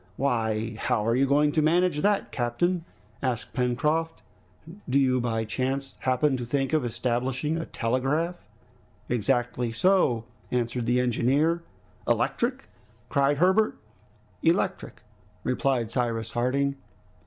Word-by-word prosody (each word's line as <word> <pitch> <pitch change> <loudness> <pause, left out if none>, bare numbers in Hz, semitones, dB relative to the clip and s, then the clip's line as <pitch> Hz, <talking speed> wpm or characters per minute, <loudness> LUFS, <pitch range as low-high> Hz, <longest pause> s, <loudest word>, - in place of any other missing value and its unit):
"Why! 110 -4 0
how 105 - 0
are 115 +1 +2
you 135 +2 +3
going 145 +2 +3
to 155 - +2
manage 165 0 +2
that, 205 0 +1
captain?" 160 +9 0 0.4
asked 125 -4 -2
Pencroft. 150 +7 0 0.7
"Do 130 - +3
you 130 -2 +3
by 115 -2 -1
chance 135 +4 -2
happen 130 +2 +1
to 125 - -4
think 135 +4 -1
of 155 -3 +3
establishing 125 +5 -1
a 165 0 -3
telegraph?" 140 +9 -1 0.7
"Exactly 120 +1 0
so," 120 -4 +2 0.2
answered 120 -1 -1
the 125 +1 +3
engineer. 135 +7 +2 0.5
"Electric?" - - 0 0.4
cried 140 +1 +2
Herbert. 190 +7 +3 0.6
"Electric," - - 0 0.4
replied 125 -6 0
Cyrus 115 -3 -1
Harding. 140 +3 0
130 Hz, 120 wpm, -26 LUFS, 120-150 Hz, 0.7 s, you